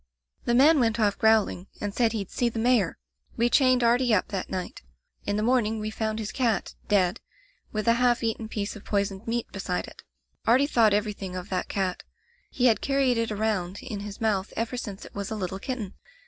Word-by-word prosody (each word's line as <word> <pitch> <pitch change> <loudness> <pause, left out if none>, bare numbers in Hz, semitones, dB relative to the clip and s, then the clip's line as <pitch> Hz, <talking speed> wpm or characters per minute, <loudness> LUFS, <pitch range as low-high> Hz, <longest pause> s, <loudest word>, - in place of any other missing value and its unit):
"The 240 - +2
man 295 +4 +6
went 230 -1 +1
off 205 -2 +2
growling, 220 -4 +3
and 205 -1 -3
said 230 -1 +2
he'd 205 -4 -4
see 240 - +1
the 230 - -7
Mayor, 225 -5 +2 0.4
We 240 +1 +2
chained 255 -3 +4
Artie 240 0 +4
up 185 - 0
that 195 -3 -4
night. 185 -1 -5 0.5
In 205 - +1
the 210 - 0
morning 225 -2 +2
we 215 0 -3
found 220 0 -2
his 215 -2 -4
cat, 230 -7 0
dead, 185 -3 +2 0.5
with 215 +1 -3
a 230 - +6
half 245 -1 +3
eaten 225 0 -2
piece 210 -1 -4
of 210 - -11
poisoned 200 +1 -2
meat 235 0 -2
beside 190 -2 -3
it. - - -13 0.5
Artie 250 +5 +5
thought 225 -7 +4
everything 205 -3 -3
of 185 +2 -6
that 185 -1 -2
cat. 190 -2 -1 0.5
He 250 - 0
had 230 -3 +4
carried 270 -3 +2
it 230 -1 -1
around 205 -3 -1
in 215 -5 -5
his 205 0 -7
mouth 210 -3 0
ever 230 +2 -2
since 205 -5 -6
it - - -13
was 200 -1 -4
a 220 - -3
little 190 -2 -4
kitten. 225 -5 -4
220 Hz, 205 wpm, -26 LUFS, 200-235 Hz, 0.5 s, man